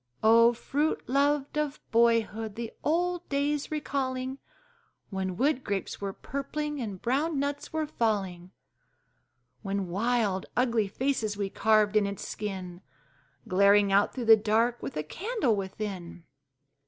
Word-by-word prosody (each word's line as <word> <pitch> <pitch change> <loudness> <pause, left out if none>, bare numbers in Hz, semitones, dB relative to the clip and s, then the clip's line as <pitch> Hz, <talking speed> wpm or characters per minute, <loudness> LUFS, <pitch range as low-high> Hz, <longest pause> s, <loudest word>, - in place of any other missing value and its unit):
Oh, 230 +2 +7
fruit 290 +6 -1
loved 285 +2 +1
of 300 -1 -2
boyhood! 225 -2 +2
the 230 -1 -5
old 355 +3 0
days 285 +1 0
recalling, 265 -3 -2 0.7
When 190 -2 -3
wood 275 0 +1
grapes 200 -1 -3
were 200 -1 -2
purpling 295 +5 -4
and 205 -5 -5
brown 285 - 0
nuts 285 +1 -2
were 315 -1 -1
falling! 195 - -1 1.1
When 195 -3 -2
wild, 205 -1 0
ugly 235 -4 +2
faces 220 -2 -1
we 200 -1 -2
carved 215 -1 +3
in 210 -2 +4
its 200 0 -5
skin, 190 -4 -5 0.7
Glaring 200 +2 +4
out 200 +1 +4
through 250 -3 -5
the 225 0 +9
dark 225 +3 +1
with - - -5
a 150 - -1
candle 360 - -1
within! 190 -3 -5
230 Hz, 130 wpm, -28 LUFS, 200-280 Hz, 1.1 s, the